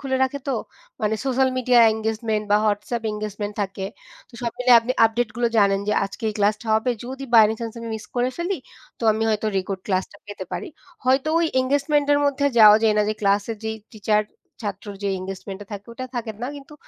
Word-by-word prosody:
খুলে 265 -2 -1
রাখে 265 +2 0
তো - - +1 0.5
মানে 215 0 +1
সোশ্যাল 265 0 +2
মিডিয়া 250 -1 +4
এনগেজমেন্ট 220 -1 -2
বা 205 - +6
WhatsApp 210 +3 -1
এনগেজমেন্ট 210 -1 -4
থাকে। 195 0 -5 0.4
তো - - -28
সব 235 - 0
মিলিয়ে 250 -1 +7
আপনি 250 +2 -2
আপডেট 230 +1 -1
গুলো 240 -1 +2
জানেন 195 -1 +4
যে 210 - +3
আজকে 200 +4 -9
এই - - -9
ক্লাসটা 210 +3 +1
হবে। 220 +3 +1
যদি 265 +2 -6
বাই 225 -2 +9
এনি 220 - -1
চান্স 230 -1 -4
আমি 230 - -6
মিস 220 - -10
করে 245 +1 +1
ফেলি 350 +2 -1 0.4
তো - - -12
আমি 220 - -2
হয়তো 215 0 0
রেকর্ড 190 0 -4
ক্লাসটা 190 0 -1
পেতে 205 -2 -7
পারি 395 - -4 0.4
হয়তো 265 +3 +2
ওই 335 - +2
এনগেজমেন্টের 285 +2 +2
মধ্যে 285 0 +1
যাওয়া 210 -1 +9
যায় 220 -1 +4
না - - +5
যে 215 - 0
ক্লাসের 205 +2 +1
যে 220 - -1 0.2
টিচার-ছাত্র 210 -1 -3 0.2
যে 200 - 0
এনগেজমেন্টটা 195 +1 -7
থাকে 205 0 -7
ওটা 255 - -6
থাকে 230 -2 -3
না 250 - -2
কিন্তু 285 +2 -12
220 Hz, 200 wpm, -23 LUFS, 205-255 Hz, 0.5 s, বাই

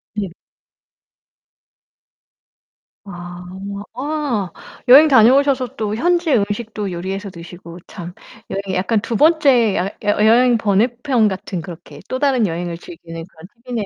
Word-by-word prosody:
네. 200 -4 -3 2.7
아. 175 -1 -9 0.5
아 265 - -2 0.4
여행 280 +5 +9
다녀오셔서 260 0 +4
또 215 -4 -2
현지의 340 0 +2
음식도 205 0 -3
요리해서 190 +3 -5
드시고 170 0 -11
참 175 -3 -9 0.4
여행 195 -1 -3
약간 205 +4 0
2 230 - -4
번째 275 - +4
여 180 - 0 0.2
여 205 +1 +2
여행 240 +2 +5
번외 215 +1 +2 0.2
편 245 -7 +3
같은 190 -2 -4
그렇게 170 +1 -11
또 255 - -2
다른 265 -5 +2
여행을 170 0 -4
즐기는 165 -1 -10
그런 165 -2 -15 0.2
팁이네요, 235 -4 -3
210 Hz, 250 characters per minute, -19 LUFS, 180-255 Hz, 2.7 s, 여행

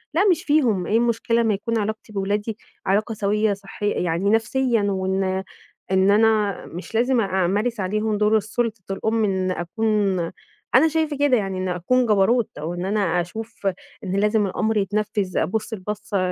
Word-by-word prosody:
لا 370 +5 +4
مش 335 - 0
فيهم 245 - +2
إيه 220 - +3
المشكلة 235 0 +1
أمّا 225 -2 +2
يكون 230 +3 -2
علاقتي 215 0 -4
بولادي 205 +2 -2 0.3
علاقة 210 +4 +1
سويّة 210 0 +1
صحيّ 200 +1 -4
يعني 175 +3 0
نفسيًا 230 +1 +2
وإن 190 -1 0 0.5
إن 190 +1 +4
أنا 215 -2 +2
مش 180 +6 -8
لازم 245 +1 +3
أمارس 200 +4 0
عليهم 210 +3 0
دور 215 +1 +3
السلطة 220 0 -2
الأم 220 +3 0
إنّي 190 -2 0
أكون 220 +6 -2 0.9
أنا 290 +6 +7
شايفة 315 -2 -1
كده 285 -3 +3
يعني 195 -2 -2
إن 185 0 -2
أكون 180 +9 +1
جبروت 220 +2 +3
أو 160 +3 -4
إن 175 +1 -4
أنا 195 -4 +1
أشوف 220 +4 -6 0.4
إن 190 -1 -3
لازم 210 +1 +2
الأمر 215 +3 0
يتنفذ، 205 -1 -1
أبُص 220 +3 -1
البَصّة 210 +1 -4
210 Hz, 160 wpm, -22 LUFS, 195-225 Hz, 0.9 s, أنا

